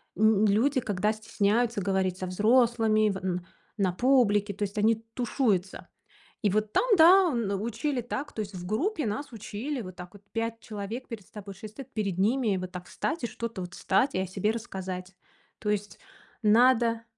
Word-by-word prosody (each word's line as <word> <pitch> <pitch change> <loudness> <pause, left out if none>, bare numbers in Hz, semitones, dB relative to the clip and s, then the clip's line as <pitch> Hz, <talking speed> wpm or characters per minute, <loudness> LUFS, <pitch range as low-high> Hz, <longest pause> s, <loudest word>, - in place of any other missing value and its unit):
ну, 215 +1 +4
люди, 240 +7 +3
когда 210 0 0
стесняются 220 +1 0
говорить 190 -1 0
со 185 - -4
взрослыми 220 +1 +3
в 195 - -2
н 180 -2 -3 0.3
на 195 -3 +2
публике, 210 -3 +3
то 205 - -4
есть 205 +1 -4
они 220 +2 +4 0.2
тушуются. 215 -6 0 0.5
И 210 - +2
вот 215 +2 0
там, - - +3
да, 355 +3 +7
н 200 -5 -1
учили 235 +4 -2
так. 260 +4 -5
То - - -8
есть 200 -1 -6
в 180 -1 -7
группе 300 - -1
нас 265 +7 -3
учили 230 +5 -5
вот 185 -3 -9
так 180 -1 -10
вот: 205 0 -15
5 230 0 -2
человек 215 +3 -6
перед 220 -5 -8
c - - -27
тобой, 205 -2 -8
6 210 +3 -10
стоит 270 -1 -10
перед 200 -5 -2
ними, 215 +1 +2
вот 185 0 -5
так 180 -1 -7
встать 330 - -3
и - - +1
что-то 230 -4 -5
вот 180 0 -7
встать 255 +8 +1
и - - +1
о 190 - 0
себе 195 +3 0
рассказать. 190 -5 -6 0.4
То 210 - -3
есть 205 0 -2 0.4
надо 230 +1 +4
215 Hz, 190 wpm, -28 LUFS, 195-235 Hz, 0.5 s, да